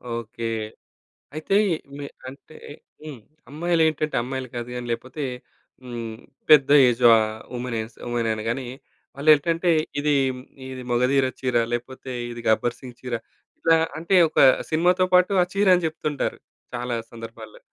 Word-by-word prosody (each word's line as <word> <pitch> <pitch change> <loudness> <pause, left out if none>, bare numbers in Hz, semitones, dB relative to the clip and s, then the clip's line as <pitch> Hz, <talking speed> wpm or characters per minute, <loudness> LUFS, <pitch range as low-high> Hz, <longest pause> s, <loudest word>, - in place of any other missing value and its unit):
Okay. 115 0 -7 0.9
అయితే 155 +5 -1 0.4
మీ 145 - -6 0.3
అంటే 140 +3 -15 0.5
హ్మ్. 150 -5 -8 0.3
అమ్మాయిలేంటంటే, 160 -1 0
అమ్మాయిలు 130 0 -5
కాదు 120 0 -5
గాని 125 0 -5
లేకపోతే 130 +6 -5 0.6
హ్మ్, 120 -2 -6 0.5
పెద్ద 145 -3 +7 0.2
ఏజా 120 0 +4
ఆహ్, 110 0 -2
వుమెన్ 120 -1 -3
ఎస్ 110 +2 -10
వుమెననగానే 115 +1 -2 0.5
వాళ్ళు 150 +3 +1
ఏంటంటే 165 +4 0 0.3
ఇది, 150 +1 +1 0.6
ఇది 130 -1 -7
'మగధీర' 130 +2 +2
చీర 125 -2 0 0.2
లేపోతే 130 +2 -5 0.2
ఇది 120 - -7
'గబ్బర్ 115 +2 +1
సింగ్' 125 -2 -11
చీర 125 -1 -6 0.5
ఇలా 165 0 +4 0.2
అంటే 170 +4 0
ఒక - - -1 0.3
సినిమాతో 180 +3 +3
పాటు 180 +2 +5
ఆ - - -2
చీరని 185 -3 +3
చెప్తుంటారు 150 -2 -3 0.4
చాలా 120 0 -3 0.2
సందర్భాల్లో. 115 - -10
130 Hz, 130 wpm, -23 LUFS, 120-155 Hz, 0.9 s, పెద్ద